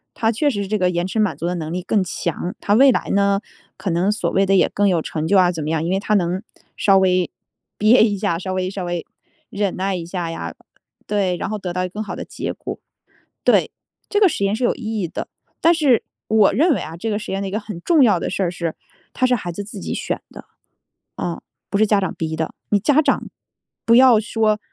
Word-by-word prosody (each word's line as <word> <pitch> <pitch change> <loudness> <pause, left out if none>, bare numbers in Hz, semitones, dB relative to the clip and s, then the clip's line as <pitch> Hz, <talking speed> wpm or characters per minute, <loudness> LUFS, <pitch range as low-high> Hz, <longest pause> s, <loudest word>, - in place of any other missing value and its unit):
他 225 -2 +1
确 290 +6 +2
实 200 -6 -2
这 215 +1 0
个 180 -2 +2
延 175 +1 -1
迟 220 - -5
满 210 -2 +1
足 170 - -4
的 180 - -1
能 160 -1 -4
力 180 - -2
更 200 0 +1
强， 175 0 -3
他 205 - +1
未 265 +4 +7
来 - - -1
呢， 200 0 +3 0.4
可 190 0 -3
能 175 +4 +1
所 220 - -1
谓 195 +1 +3
的 195 - +2
也 185 - +4
更 205 -1 +2
有 170 -3 +2
成 155 0 -3
就 200 - +4
啊 180 -1 +5
怎 160 -3 -5
么 155 - -3
样， 160 -1 0
因 175 - -1
为 195 - +1
他 210 +1 -1
能 180 +2 0 0.3
稍 195 -2 +4
微 185 -1 +2 0.5
憋 220 +3 +6
一 205 -3 +1
下， 190 -5 0
稍 185 0 -4
微 185 0 -1
稍 195 -1 -5
微 175 -1 -3 0.4
忍 200 -2 -1
耐 190 0 -1
一 170 -2 -5
下 175 -1 -4
呀， 85 - -5 0.5
对， 195 -4 0
然 - - -3
后 215 - -2
得 185 -3 -5
到 180 0 -1
更 210 +4 -5
好 - - -6
的 - - -5
结 - - -4
果， - - -7 0.7
对， - - +4 0.4
这 410 - +1
个 400 - +7
实 200 - -3
验 200 +2 +1
是 250 - -2
有 - - +2
意 - - -11 0.2
义 175 - -1
的。 - - -6 0.3
但 335 - +5
是 280 -8 +3 0.3
我 215 -3 +4
认 305 - +3
为 - - -2
啊， 160 +1 -7
这 225 +6 -4
个 205 - 0
实 - - -7
验 195 - -1
的 - - -3
一 - - -5
个 215 - -1
很 205 -5 -8
重 320 -5 +4
要 205 -7 +5
的 - - -2
事 195 - -2
儿 175 - 0
是， 170 -2 -3 0.4
它 255 - +2
是 250 - +3
孩 175 -5 -5
子 205 - -5
自 210 - -9
己 - - -4
选 - - -3
的， - - -12 0.7
啊， - - -3 0.3
不 200 - 0
是 215 - +4
家 205 -1 +3
长 190 - -2
逼 160 -1 -3
的， 160 0 -2 0.2
你 205 - +4
家 290 +7 +4
长 - - 0 0.6
不 230 - +4
要 250 -3 +7
说 215 -1 +1
195 Hz, 270 characters per minute, -20 LUFS, 180-215 Hz, 0.7 s, 未